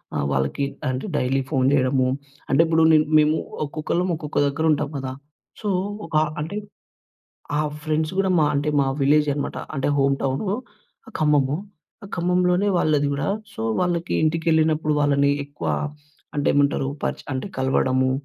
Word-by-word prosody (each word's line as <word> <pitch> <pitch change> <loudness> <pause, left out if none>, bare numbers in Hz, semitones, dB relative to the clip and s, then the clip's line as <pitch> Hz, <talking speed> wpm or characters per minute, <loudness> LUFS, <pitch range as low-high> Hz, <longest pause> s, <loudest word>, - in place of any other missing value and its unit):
ఆహ్, 70 - 0
వాళ్ళకి 70 - 0 0.2
అంటే 130 0 -3
డైలీ 135 0 +1
ఫోన్ 130 -1 +2
చేయడము, 130 -1 +2 0.4
అంటే 135 +5 +4
ఇప్పుడు 160 0 +3
నే 155 - +7 0.2
మేము 155 +1 +4 0.3
ఒక్కొక్కళ్ళం 165 +5 -2
ఒక్కొక్క 155 -2 -6
దగ్గర 155 +3 -1
ఉంటాం 150 0 0
కదా! 130 -1 -4 0.5
సో, 210 - -2 0.4
ఒక 165 - -7 0.3
అంటే, 180 +7 -4 1.0
ఆ - - +1 0.2
ఫ్రెండ్స్ 155 +1 0
కూడా 190 - +2
మా 150 - +4
అంటే 145 +1 0
మా 140 - +3 0.2
విలేజే 150 +1 +4
అనమాట. 145 - -3 0.2
అంటే 135 +1 0
హోమ్ 140 0 +3
టౌనూ, 135 +9 -1 0.7
ఖమ్మము. 145 -1 +2 0.6
ఖమ్మంలోనే 180 +2 +2
వాళ్ళది 150 -4 +2
గూడా. 140 +1 -2 0.3
సో, - - -6 0.2
వాళ్ళకి 175 -1 -1
ఇంటికి 160 +1 0
ఎళ్ళినప్పుడు, 155 -1 +2
వాళ్ళని 140 -1 +3
ఎక్కువ 145 0 -7 0.7
అంటే 145 - 0
ఏమంటారు 140 -1 +2 0.2
పరిచె - - -2
అంటే 130 +9 -3
కలవడము. 130 0 +2
145 Hz, 145 wpm, -23 LUFS, 135-160 Hz, 1.0 s, నే